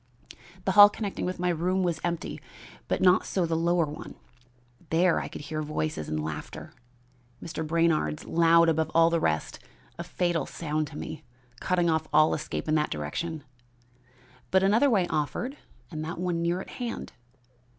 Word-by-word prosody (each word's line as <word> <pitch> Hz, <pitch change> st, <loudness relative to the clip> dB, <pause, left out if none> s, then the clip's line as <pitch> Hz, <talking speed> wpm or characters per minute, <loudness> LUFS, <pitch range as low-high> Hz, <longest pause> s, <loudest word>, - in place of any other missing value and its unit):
The -, -, +2 dB
hall 205 Hz, -1 st, +9 dB
connecting 205 Hz, -1 st, -4 dB
with 185 Hz, 0 st, -3 dB
my 180 Hz, 0 st, 0 dB
room 180 Hz, +3 st, 0 dB
was 175 Hz, -2 st, -1 dB
empty, 170 Hz, -1 st, -3 dB, 0.5 s
but -, -, -1 dB
not 180 Hz, 0 st, +5 dB
so 185 Hz, -3 st, -1 dB
the 165 Hz, 0 st, -1 dB
lower 170 Hz, +1 st, +2 dB
one. 150 Hz, 0 st, -9 dB, 0.7 s
There 170 Hz, +2 st, +3 dB
I -, -, -4 dB
could -, -, -8 dB
hear 155 Hz, +1 st, -4 dB
voices 155 Hz, -, -3 dB
and 75 Hz, 0 st, -2 dB
laughter, 80 Hz, -1 st, -7 dB, 0.7 s
Mr. 160 Hz, -1 st, -6 dB
Brainard's 160 Hz, -, +1 dB
loud 170 Hz, 0 st, +4 dB
above 160 Hz, -1 st, +1 dB
all 165 Hz, 0 st, +5 dB
the 170 Hz, -, +2 dB
rest, 80 Hz, -, -1 dB, 0.4 s
a -, -, -3 dB
fatal 175 Hz, -4 st, -1 dB
sound 155 Hz, -2 st, -2 dB
to 150 Hz, -, -10 dB
me, 155 Hz, -, -7 dB, 0.4 s
cutting 180 Hz, -1 st, +1 dB
off 160 Hz, -1 st, +1 dB
all 155 Hz, +1 st, +5 dB
escape 150 Hz, -, -4 dB
in 155 Hz, -, +1 dB
that 150 Hz, -1 st, +2 dB
direction. 145 Hz, -, -4 dB, 1.1 s
But 190 Hz, 0 st, +3 dB
another 225 Hz, +8 st, +4 dB
way 200 Hz, -7 st, +3 dB
offered 160 Hz, -, -2 dB, 0.4 s
and 155 Hz, -2 st, -4 dB
that 165 Hz, +2 st, -5 dB
one 175 Hz, -1 st, -1 dB
near 170 Hz, +2 st, 0 dB
at -, -, -10 dB
hand. 235 Hz, -2 st, -5 dB
165 Hz, 170 wpm, -27 LUFS, 155-180 Hz, 1.1 s, hall